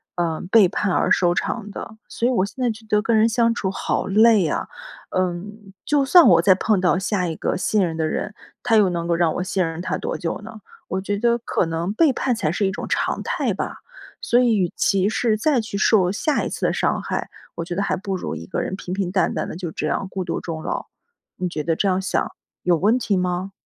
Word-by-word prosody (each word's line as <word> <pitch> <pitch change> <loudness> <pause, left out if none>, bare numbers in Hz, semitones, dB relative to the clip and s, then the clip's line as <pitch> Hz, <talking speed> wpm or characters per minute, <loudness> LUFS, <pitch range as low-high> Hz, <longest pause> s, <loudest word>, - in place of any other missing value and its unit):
呃， 165 -2 -1
背 215 -5 +7
叛 205 +1 -1
而 - - +1
收 175 -1 +4
场 210 +4 -3
的， 215 - -8
所 235 - -1
以 255 - +2
我 195 -6 +2
现 255 +6 -9
在 245 - +2
觉 220 0 -6
得 210 -1 +2
跟 225 0 +2
人 220 - +5
相 230 0 +2
处 190 -5 -2
好 - - -2
累 215 -1 +5
啊。 - - -2 0.4
呃， 185 -1 0 0.5
就 290 -2 +2
算 340 +4 +7
我 - - +6
再 190 - +6
碰 200 +1 +1
到 180 0 +2
下 190 -1 -1
一 165 - -3
个 - - -2
信 205 +2 +1
任 165 -2 -4
的 160 - 0
人， 210 +6 -3 0.3
他 225 - +2
又 205 -3 +4
能 170 -1 -3
够 170 - +2
让 165 -2 +2
我 180 - -1
信 185 -2 0
任 165 +1 -4
他 - - -2
多 - - -3
久 165 - -3
呢？ 220 0 -10 0.3
我 190 +1 -2
觉 200 +1 -2
得 235 +2 +2
可 225 - -1
能 165 +3 -2
背 310 +5 +4
叛 255 -1 0
才 155 -9 -1
是 195 +2 0
一 - - -1
种 190 - -5
常 - - -1
态 - - -1
吧。 - - -4 0.4
所 240 - +3
以 240 -3 +3
与 185 -4 0
其 195 0 +2
是 220 -1 +1
再 275 +2 +2
去 215 -2 -4
受 200 -3 +3
下 290 +9 0
一 - - -2
次 - - -1
伤 - - 0
害， - - -3 0.3
我 170 0 -4
觉 175 - -5
得 200 - -1
还 - - 0
不 195 0 -4
如 175 - -4
一 85 +1 -7
个 - - -3
人 190 - -3
平 185 -1 -6
平 190 -2 -2
淡 190 0 +1
淡 - - -2
地， - - -6
就 175 -1 -5
这 155 - -3
样 190 - -1
孤 190 -1 -3
独 - - -3
终 160 -2 -5
老。 - - -4 0.5
你 180 - -2
觉 155 -3 -4
得 165 +1 0
这 200 - 0
样 185 0 +2
想 190 - 0 0.4
有 175 -1 +3
问 215 +9 +2
题 205 -5 0
吗？ 180 +1 -2
195 Hz, 265 characters per minute, -22 LUFS, 175-220 Hz, 0.5 s, 背